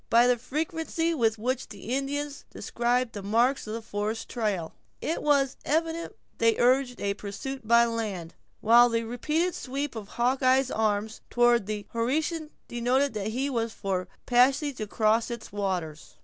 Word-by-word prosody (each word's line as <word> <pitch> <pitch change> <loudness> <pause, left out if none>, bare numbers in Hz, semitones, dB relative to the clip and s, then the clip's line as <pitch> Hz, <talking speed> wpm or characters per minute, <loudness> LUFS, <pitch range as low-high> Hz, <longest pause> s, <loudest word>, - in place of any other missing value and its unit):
By 235 +1 +6
the 250 0 +4
frequency 325 +5 -2
with 225 -7 +1
which 255 +4 -2
the 205 0 -10
Indians 285 +1 -3
described 240 0 -1
the 205 - -5
marks 235 +6 +1
of 215 - -3
a 230 - -5
forest 210 +1 -3
trial, 205 -9 -2 0.3
it 325 - -2
was 280 -3 +2
evident 325 +2 -1 0.2
they 230 0 +3
urged 250 0 +2
a 200 0 0
pursuit 215 +5 -6
by 235 +1 +6
land, 210 -8 -3 0.3
while 240 +2 +7
the 230 0 0
repeated 300 +10 -1
sweep 275 0 -4
of 215 -3 -6
Hawkeye's 255 +3 +2
arm 215 -1 +1 0.2
toward 240 -3 +3
the 210 -1 -4
Horican 305 +7 -1 0.2
denoted 250 +3 +1
that 210 -1 -3
he 255 +6 -1
was 230 -4 -1
for 190 -2 -2
a 180 - -12 0.2
passage 265 +3 +3
across 215 +2 +1
its 235 -2 -7
waters. 185 -6 -3
240 Hz, 160 wpm, -27 LUFS, 215-270 Hz, 0.3 s, while